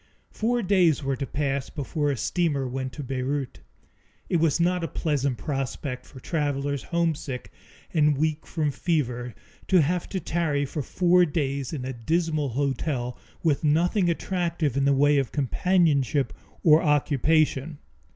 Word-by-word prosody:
Four 235 +2 0
days 180 -6 +3
were 135 0 0
to 135 +1 -4
pass 140 -2 -2
before 145 0 -2
a 140 - -1
steamer 145 - 0
went 130 +1 -4
to 145 - -6
Beirut. 135 +1 -3 0.7
It 175 - +2
was 160 -1 +2
not 180 +1 +1
a - - 0
pleasant 140 -4 -1
prospect 135 -2 -4
for 130 - -12
travelers 140 -2 -1
homesick 160 -7 -2 0.4
and 150 -3 +3
weak 155 +1 -1
from 155 -3 -1
fever 125 -6 -1 0.3
to 185 -4 +5
have 175 +4 -1
to 190 - -2
tarry 155 -5 0
for 145 +2 -4
four 180 +5 +3
days 140 -4 -2
in 135 -5 -4
a 130 - -3
dismal 155 +4 0
hotel, 130 -1 -1 0.3
with 155 -3 +1
nothing 175 +5 +2
attractive 170 -5 -1
in 140 0 +2
the 140 - +4
way 145 +1 +4
of 135 - -2
companionship 145 -2 +1 0.3
or 155 0 +6
occupation. 150 0 +2
145 Hz, 150 wpm, -26 LUFS, 135-165 Hz, 0.7 s, or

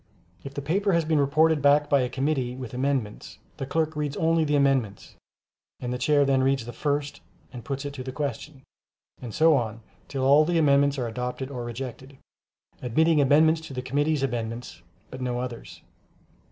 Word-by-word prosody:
If 135 0 -9
the 140 - -4
paper 195 +6 +1
has 170 -2 +2
been 155 -1 +2
reported 155 +2 +3
back 145 +1 +4
by 140 -2 +3
a 125 - -1
committee 130 -2 -1
with 130 -3 -8
amendments, 130 -4 -3 0.2
the 135 - -5
clerk 160 +1 -1
reads 150 -2 -3
only 165 0 +2
the 150 -1 +1
amendments, 135 -8 0 0.6
and 125 0 -4
the 125 - -4
Chairman 145 +2 +3
then 135 -1 +2
reads 135 -3 +1
the 120 - -8
first 145 -1 -2 0.3
and 120 -2 -8
puts 135 +3 -4
it 145 - -5
to 130 -2 -7
the 130 - -5
question, 145 0 -5 0.6
and 120 - -7
so 160 +5 +4
on 115 -3 -2 0.3
till 135 -2 -3
all 140 +3 +6
the 170 +2 0
amendments 140 -2 +3
are 125 - -2
adopted 125 +3 -4
or 125 -3 -5
rejected, 130 +3 -7 0.6
admitting 155 +6 +2
amendments 155 +3 +4
to 150 -4 -9
the 125 - -4
committee's 145 +2 0
amendments, 120 -2 -4 0.3
but 130 - -8
no 125 -1 -2
others. 125 -2 -7
140 Hz, 185 wpm, -25 LUFS, 125-150 Hz, 0.6 s, all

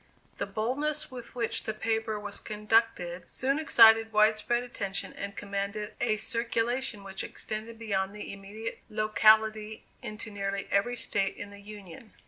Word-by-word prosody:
The - - -1
boldness 265 +9 -1
with 245 -1 -9
which 235 -2 -1
the 220 - -2
paper 220 -1 -1
was 205 -1 -4
conducted 210 -5 +1
soon 275 +3 +1
excited 225 -7 +7
wide 215 0 +5
spread 240 +3 0
attention 200 -5 -4
and 200 0 -6
commanded 200 +1 -3
a 220 -3 +2
circulation 235 0 -1
which 195 -1 -4
extended 220 +2 -6
beyond 200 -3 -1
the 210 - -6
immediate 205 +3 -7
locality 215 0 +3 0.2
into 215 +1 -6
nearly 195 -1 -3
every 240 +5 +2
State 195 -4 0
in 205 0 -7
the 200 0 -12
Union. 205 -1 -11
215 Hz, 145 wpm, -29 LUFS, 200-230 Hz, 0.2 s, excited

